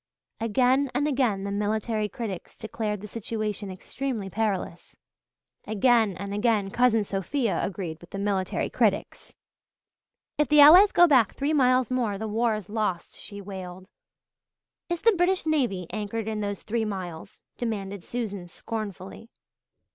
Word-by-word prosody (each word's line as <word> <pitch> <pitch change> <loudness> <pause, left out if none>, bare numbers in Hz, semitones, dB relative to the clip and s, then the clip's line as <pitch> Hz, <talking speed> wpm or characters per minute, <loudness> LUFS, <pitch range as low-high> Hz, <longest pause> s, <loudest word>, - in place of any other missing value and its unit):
Again 255 +5 +2
and 285 +3 +1
again 250 -9 +1
the 200 - -3
military 210 +1 -1
critics 200 -4 -6
declared 215 -2 -4
the 210 - -7
situation 210 -1 -4
extremely 210 +2 -5
perilous. 195 -5 -3 0.7
Again 220 -1 +3
and 200 +1 -5
again 210 -2 +1
Cousin 240 -2 +3
Sophia 205 +4 -1
agreed 170 -4 -4
with 175 - -14
the - - -6
military 195 -2 -1
critics. - - -1 1.0
"If 300 - +3
the 300 +3 +5
Allies 350 +8 +9
go 350 - +7
back 260 - +4
three 285 +3 0
miles 255 -3 +3
more 235 -6 0
the 220 +2 -4
war 225 +1 +1
is 210 -4 -7
lost," 205 -5 -2
she 200 -1 -9
wailed. 185 -1 -8 1.0
"Is 345 -1 -3
the 460 - +6
British 365 0 +1
navy 250 - 0
anchored 215 +1 -4
in 215 -1 -2
those 205 -1 -4
three 225 +1 -1
miles?" 185 -4 -6 0.2
demanded 200 -5 -3
Susan 205 -3 -5
scornfully. 210 +2 -7
215 Hz, 140 wpm, -26 LUFS, 195-245 Hz, 1.0 s, Allies